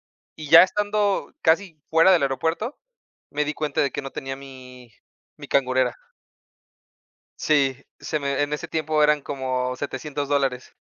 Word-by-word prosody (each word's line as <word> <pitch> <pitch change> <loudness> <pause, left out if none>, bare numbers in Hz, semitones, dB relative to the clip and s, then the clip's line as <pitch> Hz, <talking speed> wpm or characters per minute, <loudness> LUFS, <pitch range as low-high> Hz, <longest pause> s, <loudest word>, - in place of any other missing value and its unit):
y 155 -2 -13
ya 165 +3 +10
estando 205 +1 0
casi 165 0 +1
fuera 165 +3 +5
del 175 -5 +4
aeropuerto, 160 - -2 0.5
me 150 +1 -1
di 150 - -2
cuenta 150 -2 -3
de 140 - +1
que - - -4
no 135 0 -8
tenía 135 0 -5
mi 130 -3 -13 0.5
mi - - -10
cangurera. 130 -1 +1 1.4
Sí, 140 -4 +2 0.2
se 155 - -2
me 140 0 -1
en 145 0 -2
ese - - -5
tiempo 155 -1 0
eran 150 0 +4
como 130 -2 -3
$700 145 +1 -4
dólares. 135 -3 -1
145 Hz, 150 wpm, -23 LUFS, 135-160 Hz, 1.4 s, ya